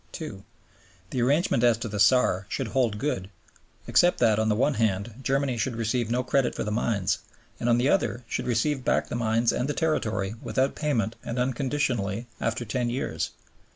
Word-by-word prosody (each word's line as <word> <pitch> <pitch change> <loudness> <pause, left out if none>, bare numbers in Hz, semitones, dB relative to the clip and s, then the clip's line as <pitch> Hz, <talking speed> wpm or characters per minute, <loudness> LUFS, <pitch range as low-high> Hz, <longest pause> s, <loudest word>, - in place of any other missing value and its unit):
(2) 110 -12 -7 0.7
The 125 - -1
arrangement 140 -1 +2
as 120 -2 +5
to 115 +1 -4
the 105 -1 -4
Saar 100 -3 +4
should 130 -5 -2
hold 120 -5 +1
good, 105 -7 -2 0.6
except 175 0 +4
that, 110 -3 +3
on 110 0 +1
the 105 - +2
one 140 +6 +2
hand, 110 -1 0
Germany 135 -1 0
should 115 +3 -1
receive 115 +1 -1
no 125 +2 +1
credit 130 0 +1
for - - -2
the 105 - -3
mines, 105 -4 0 0.4
and, 120 - 0
on 120 - +5
the 125 +2 +2
other, 135 -10 +1
should - - -3
receive 130 +3 +1
back - - +2
both - - -19
the - - -1
mines 115 0 +2
and 125 +3 -1
the 150 - -1
territory 110 - 0
without 135 +1 0
payment 120 -7 -1
and 115 - -4
unconditionally 125 -4 -1
after 115 +1 -1
ten 120 +2 -1
years. 80 -10 -2
120 Hz, 190 wpm, -26 LUFS, 110-130 Hz, 0.7 s, as